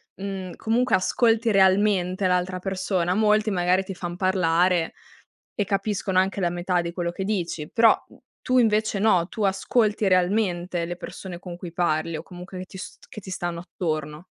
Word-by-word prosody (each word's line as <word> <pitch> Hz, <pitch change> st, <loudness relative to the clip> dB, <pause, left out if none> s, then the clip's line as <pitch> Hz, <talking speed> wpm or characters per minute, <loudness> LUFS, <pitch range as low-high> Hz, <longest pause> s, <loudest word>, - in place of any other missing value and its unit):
mhmm, 190 Hz, -2 st, -5 dB
comunque 235 Hz, 0 st, +2 dB
ascolti 225 Hz, +4 st, +2 dB
realmente 190 Hz, -1 st, +3 dB
l'altra 180 Hz, 0 st, 0 dB
persona, 185 Hz, -2 st, -1 dB
molti 215 Hz, 0 st, +3 dB
magari 185 Hz, +1 st, +2 dB
ti 195 Hz, -, -6 dB
fan 175 Hz, -1 st, -5 dB
parlare 180 Hz, -2 st, +2 dB, 0.6 s
e 205 Hz, -, +1 dB
capiscono 195 Hz, -1 st, 0 dB
anche 195 Hz, +1 st, 0 dB
la 175 Hz, -, +2 dB
metà 175 Hz, 0 st, 0 dB
di 170 Hz, -, -4 dB
quello 170 Hz, 0 st, -2 dB
che 190 Hz, -, -5 dB
dici, 175 Hz, -6 st, -2 dB
però 230 Hz, -1 st, +6 dB, 0.4 s
tu 255 Hz, -, +1 dB
invece 215 Hz, -3 st, +2 dB
no, 185 Hz, -5 st, +3 dB
tu 220 Hz, -, -4 dB
ascolti 205 Hz, +1 st, +1 dB
realmente 180 Hz, -2 st, +1 dB
le 175 Hz, +1 st, -4 dB
persone 180 Hz, 0 st, -8 dB
con 180 Hz, -1 st, -8 dB
cui 175 Hz, -1 st, -8 dB
parli 165 Hz, -2 st, 0 dB
o 155 Hz, -, -7 dB
comunque 180 Hz, +1 st, -10 dB
che 185 Hz, -, -6 dB
ti 190 Hz, -, -12 dB
st 190 Hz, -, -10 dB
che 215 Hz, -, -9 dB
ti 190 Hz, -, -10 dB
stanno 175 Hz, -2 st, -3 dB
attorno. 155 Hz, -2 st, -4 dB
185 Hz, 170 wpm, -24 LUFS, 175-200 Hz, 0.6 s, però